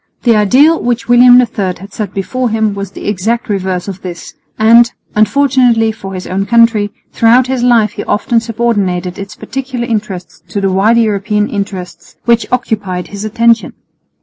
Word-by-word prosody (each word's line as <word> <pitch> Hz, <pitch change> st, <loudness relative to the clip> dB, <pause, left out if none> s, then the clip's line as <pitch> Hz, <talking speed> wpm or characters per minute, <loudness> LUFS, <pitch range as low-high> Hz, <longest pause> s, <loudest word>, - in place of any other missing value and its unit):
The 235 Hz, -3 st, +4 dB
ideal 260 Hz, +11 st, +4 dB
which 240 Hz, 0 st, -2 dB
William 245 Hz, +1 st, +7 dB
III 200 Hz, -7 st, -1 dB
had 195 Hz, +3 st, -13 dB
set 210 Hz, -4 st, -4 dB
before 245 Hz, +6 st, -2 dB
him 220 Hz, -1 st, 0 dB
was 200 Hz, -1 st, -5 dB
the 195 Hz, -, -9 dB
exact 215 Hz, +4 st, -1 dB
reverse 190 Hz, -2 st, -2 dB
of 195 Hz, -1 st, -7 dB
this; 175 Hz, -2 st, -8 dB, 0.2 s
and, 230 Hz, +2 st, +5 dB, 0.2 s
unfortunately 240 Hz, -1 st, +2 dB
for 195 Hz, -3 st, -8 dB
his 185 Hz, -, -6 dB
own 195 Hz, +2 st, -3 dB
country, 230 Hz, -3 st, +3 dB, 0.2 s
throughout 235 Hz, +3 st, +4 dB
his 260 Hz, -1 st, -2 dB
life 235 Hz, -4 st, +3 dB
he -, -, -6 dB
often 230 Hz, +2 st, +1 dB
subordinated 205 Hz, -6 st, -2 dB
its 200 Hz, +1 st, -8 dB
particular 260 Hz, -2 st, -5 dB
interests 190 Hz, -7 st, -5 dB
to 205 Hz, -, -3 dB
the 195 Hz, -1 st, 0 dB
wider 215 Hz, +5 st, +3 dB
European 210 Hz, -1 st, 0 dB
interests 195 Hz, -4 st, -6 dB
which 235 Hz, -1 st, +1 dB
occupied 205 Hz, -7 st, -2 dB
his 200 Hz, 0 st, -7 dB
attention. 230 Hz, +1 st, +1 dB
215 Hz, 165 wpm, -13 LUFS, 195-235 Hz, 0.2 s, William